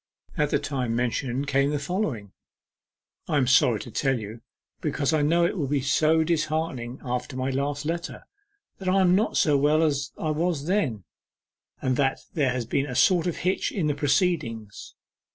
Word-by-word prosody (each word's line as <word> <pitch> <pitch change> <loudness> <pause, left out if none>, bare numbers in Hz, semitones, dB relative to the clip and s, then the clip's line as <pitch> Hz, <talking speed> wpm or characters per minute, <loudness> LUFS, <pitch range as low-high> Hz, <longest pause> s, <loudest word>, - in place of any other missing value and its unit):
At 150 -1 +1
the - - +2
time 125 -5 -2
mentioned 125 +2 -1
came 140 0 +2
the 150 - 0
following: 145 - -3 1.0
'I 150 - +1
am 135 - +3
sorry 125 -3 +4
to 120 - -9
tell 135 +2 +1
you, 110 +2 -8 0.4
because 140 +3 0
I 155 - +2
know 170 +4 +3
it 175 - -1
will 145 - -1
be 140 0 0
so 155 +4 +3
disheartening 155 -6 -2
after 125 +1 -3
my 130 +1 -1
last 140 +2 -2
letter, 170 +2 -4 0.6
that 190 -1 -2
I 190 +1 +3
am 180 -1 +4
not 210 +4 +1
so 150 -3 +4
well 150 +3 +3
as 140 -4 0
I 155 - -1
was 155 -2 -1
then, 155 - 0 0.8
and 130 -1 +1
that 135 -1 +1
there 145 -5 +1
has 125 -2 -2
been 135 +5 -1
a 125 - -5
sort 180 +5 +4
of 175 - -1
hitch 185 +2 0
in 185 -6 -1
the 150 - +1
proceedings. 140 - -1
145 Hz, 185 wpm, -25 LUFS, 130-160 Hz, 1.0 s, sorry